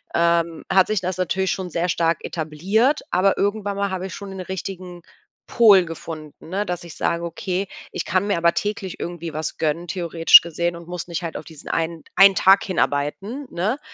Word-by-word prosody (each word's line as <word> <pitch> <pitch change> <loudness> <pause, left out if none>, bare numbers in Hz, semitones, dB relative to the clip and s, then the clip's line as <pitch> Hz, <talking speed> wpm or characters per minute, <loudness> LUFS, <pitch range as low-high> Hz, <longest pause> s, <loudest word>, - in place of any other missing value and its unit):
ähm, 170 -1 +1
hat 190 -1 +5
sich 215 -2 0
das 185 0 -3
natürlich 190 +1 0
schon 185 -2 -4
sehr 175 +2 -1
stark 165 -1 0
etabliert. 190 - 0
Aber 195 +2 +2
irgendwann 205 0 -1
mal 200 -1 -1
habe 190 0 -3
ich - - -8
schon 200 -1 -8
nen 190 - -8
richtigen 185 -1 -7 0.5
Pol 210 -6 +6
gefunden, 160 -1 -9
ne, 195 +3 -1
dass 180 -3 -4
ich 170 -2 -11
sage: 170 0 -1
„Okay, 185 +3 -3 0.2
ich - - -4
kann 185 +2 0
mir 200 - +1
aber 170 0 +3
täglich 205 -3 -3
irgendwie 170 -2 -5
was 155 0 -4
gönnen, 165 +2 -1
theoretisch 170 -2 +6
gesehen, 170 +1 -2
und 170 0 -11
muss 180 -1 -6
nicht 170 0 -4
halt 165 - -5
auf - - -8
diesen 160 -3 -12
einen 165 0 -2
einen 195 -1 +7
Tag 195 +1 +5
hinarbeiten, 195 - -2
ne, 210 +11 -1
180 Hz, 195 wpm, -22 LUFS, 170-195 Hz, 0.5 s, einen